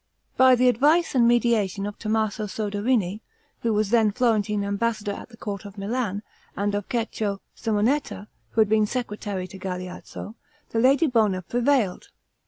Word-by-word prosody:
By 260 0 +6
the 250 +1 +3
advice 295 +8 +3
and 240 -3 +4
mediation 225 -5 +2
of 205 0 -6
Tommaso 215 -1 -1
Soderini, 205 0 -1 0.4
who 230 - 0
was 210 -1 0
then 225 -3 +4
Florentine 210 -3 +1
ambassador 205 +1 -1
at 200 - -8
the 225 - -15
court 200 -2 -5
of 200 0 -11
Milan, 205 0 -2 0.3
and 205 +1 0
of 205 -1 -2
Cecco 220 -4 -2 0.2
Simonetta, 215 -2 -1 0.2
who 225 - +2
had 215 - +4
been 215 0 +3
secretary 205 -6 -4
to 190 +1 -11
Galeazzo, 185 +2 -6 0.4
the 225 - 0
lady 270 +7 +4
Bona 215 -9 +2
prevailed. 240 -2 +1
215 Hz, 155 wpm, -25 LUFS, 200-240 Hz, 0.4 s, By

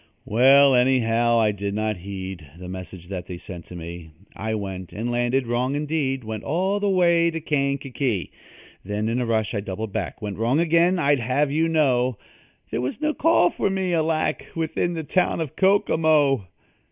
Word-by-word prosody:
Well, 135 +5 +6
anyhow, 120 -2 +3
I 110 -2 +3
did 100 0 -4
not 110 -1 -1
heed 95 -4 -7
The 90 0 -9
message 90 -1 -8
that 90 -3 -5
they 90 - -6
sent 85 -1 -9
to 90 - -11
me. 85 -1 -8 0.3
I 110 0 -3
went, 95 -3 -6
and 115 +3 -3
landed 120 +2 +1
wrong 125 +3 -1
indeed 145 -3 -1
Went 110 -1 -5
all 190 +7 0
the 205 0 0
way 170 -3 +3
to 165 0 -4
Kankakee. 140 - -1 0.5
Then, 105 +2 -2
in 120 +3 0
a 120 - -2
rush, 110 -3 0
I 105 - -1
doubled 100 +1 -5
back - - -3
Went 105 -1 -5
wrong 120 +6 +2
again, 170 +2 +3
I'd 145 -4 +2
have 130 +5 0
you 160 +3 +2
know. 130 -7 +2 0.5
There 115 - -1
was 130 - -3
no 305 0 0
call 300 - +3
for - - -1
me, 190 -2 -1
alack! 160 -1 0
Within 165 +1 -1
the 160 - -3
town 180 +4 +1
of 155 -5 -4
Kokomo. 155 - +3
125 Hz, 180 wpm, -23 LUFS, 105-160 Hz, 0.5 s, Well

